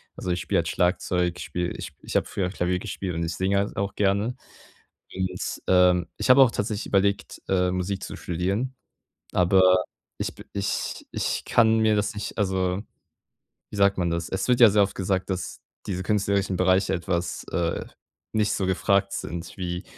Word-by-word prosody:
Also, 90 - -5
ich 90 - -1
spiele 85 - +1
halt 85 - -1
Schlagzeug, 90 0 +1
ich 90 - -6
spiele 85 +3 -2
ich - - -7
ich - - -7
habe - - +2
früher 95 -2 -2
Klavier 90 -1 -1
gespielt 95 -3 -4
und 85 - -1
ich 85 0 -3
singe 100 +3 +1
auch 100 0 -2
gerne. 100 +4 +1 0.8
Und, 95 -1 -3
ähm, 90 -1 +4
ich - - -2
habe 130 +2 +8
auch 120 - +3
tatsächlich 105 0 -2
überlegt, 100 0 0
äh, 90 -1 +2
Musik 95 +2 -2
zu - - -6
studieren, 100 +9 -2 0.6
aber 95 +1 +4 0.6
ich - - -2
b - - -11
ich 100 -1 -3
ich - - -2
kann 110 -1 +4
mir 110 -1 +3
das 105 -1 0
nicht 105 - -5
also, 95 -1 0 0.9
wie - - -7
sagt 100 -1 +3
man 85 -2 +1
das? 85 0 -2
Es 95 - -2
wird 125 -1 +4
ja 115 - +10
sehr 105 +1 +4
oft 100 - 0
gesagt, 95 0 -1
dass 95 -2 -4 0.3
diese 95 -2 -2
künstlerischen 100 -1 0
Bereiche 95 +1 +3
etwas, 85 -1 -2
äh, 85 -1 -1 0.5
nicht 105 -1 +1
so 95 - -1
gefragt 100 +1 +2
sind 85 +3 -5
wie 90 -1 -4
95 Hz, 180 wpm, -25 LUFS, 90-100 Hz, 0.9 s, ja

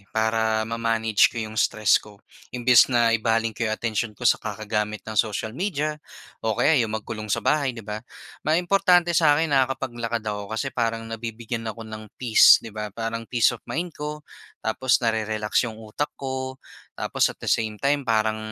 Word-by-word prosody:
para 110 0 +1
ma-manage 115 -1 +2
ko - - -13
'yong 110 -1 -4
stress 110 -1 +3
ko. 105 -1 -15 0.3
Imbes 125 0 +5
na 120 -2 +3
ibaling 115 0 +1
ko 115 +1 -2
'yong 110 - -1
atensyon 110 -1 -2
ko 120 - -8
sa - - +4
kakagamit 105 -1 -3
ng 110 -1 +2
social 110 0 -4
media 155 - -2 0.4
o 110 -2 -1
kaya 150 -4 +4
'yong 110 -1 -1
magkulong 110 0 -6
sa - - -1
bahay 140 -5 +1
'di 115 - -9
ba, 105 0 -5 0.4
may 155 +2 +1
importante 180 -1 +3
sa'kin 155 -1 +3
na 135 -1 +4
nakakapaglakad 120 -3 -4
ako. 105 -1 -4
Kasi - - -2
parang 115 -1 -1
nabibigyan 115 0 -5
ako 115 0 -7
ng 110 -1 -9
peace 120 -3 +7
'di 115 - -8
ba, 105 0 -4
parang 115 +2 -5
peace 120 -1 +3
of 120 - -8
mind 170 +1 -3
ko, 150 +1 -6 0.4
tapos 125 +3 +2
narerelax 110 0 0
'yong 110 - -9
utak 110 +6 -4
ko, 130 -1 -4 0.4
tapos - - +1
at - - -8
the - - -1
same 110 -2 0
time 140 +4 +1
parang 110 -1 +1
115 Hz, 180 wpm, -24 LUFS, 110-130 Hz, 0.4 s, peace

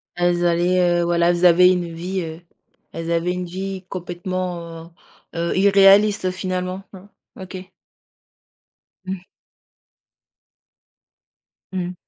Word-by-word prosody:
Elles 175 0 +1
allaient, 175 +1 +2
heu, - - +1
voilà, 170 0 +2
elles 175 +1 +2
avaient 180 +1 +7
une 175 -2 -2
vie, 180 +3 -4
heu, 160 0 -7 0.5
elles 165 0 -5
avaient 170 +1 0
une 180 0 -4
vie 190 +1 -6
complètement, 175 -2 -5 0.4
heu, 170 0 -1
irréaliste 195 0 +5
finalement, 185 0 -4
hein? 195 +1 -13 0.3
OK. 185 0 -9 1.3
Mmh. 190 +1 -3 2.6
Mmh, 180 -1 -3
180 Hz, 105 wpm, -21 LUFS, 170-185 Hz, 2.6 s, avaient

